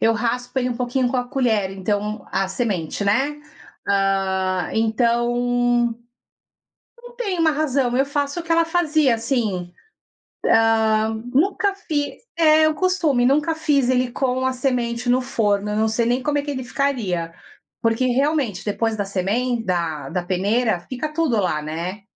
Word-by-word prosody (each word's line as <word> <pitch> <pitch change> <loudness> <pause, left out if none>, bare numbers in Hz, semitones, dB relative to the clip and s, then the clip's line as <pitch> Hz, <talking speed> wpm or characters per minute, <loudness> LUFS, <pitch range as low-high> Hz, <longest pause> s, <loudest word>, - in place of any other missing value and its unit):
eu 225 - +4
raspo 245 +3 -2
ele 250 -1 0
um 240 - -3
pouquinho 250 +1 0
com 260 - -1
a 245 - 0
colher, 225 -8 +1
então 205 +2 -3
a 195 -1 0
semente, 190 -4 -2
né. 270 +9 +1 0.5
Ah, 190 -2 +1
então 235 +2 +1 1.7
não 485 0 -13
tem 405 -7 -2
uma 325 -1 +4
razão, 275 -5 0
eu 270 +1 +2
faço 285 +2 -2
o - - -6
que 335 - -1
ela 335 0 +4
fazia, 315 -6 +2
assim. 220 -7 -2 1.4
Ah, - - -3 0.2
nunca 390 +7 +2
fiz 300 -7 -3 0.2
é, 310 -1 +5
o 310 - -1
costume, 320 -8 +1
nunca 300 +5 +2
fiz 280 -5 +1
ele 250 -1 +1
com 260 -1 0
a 260 - +1
semente 245 -2 -1
no 250 - +4
forno, 210 -5 0
eu - - -2
não 220 +1 +2
sei 230 +2 0
nem 245 +2 0
como 295 -1 0
é - - +1
que 290 - -6
ele 260 -2 -4
ficaria. 220 -12 -2 0.5
Porque 230 +2 +1
realmente, 260 - 0
depois 220 +2 -1
da 205 - 0
semen 220 +6 -1
da 165 -6 -2
da 180 +1 -2
peneira, 200 +3 +1
fica 255 +9 -5
tudo 305 -8 +1
lá, 175 -6 0
né. 170 +6 -5
245 Hz, 160 wpm, -21 LUFS, 205-280 Hz, 1.7 s, é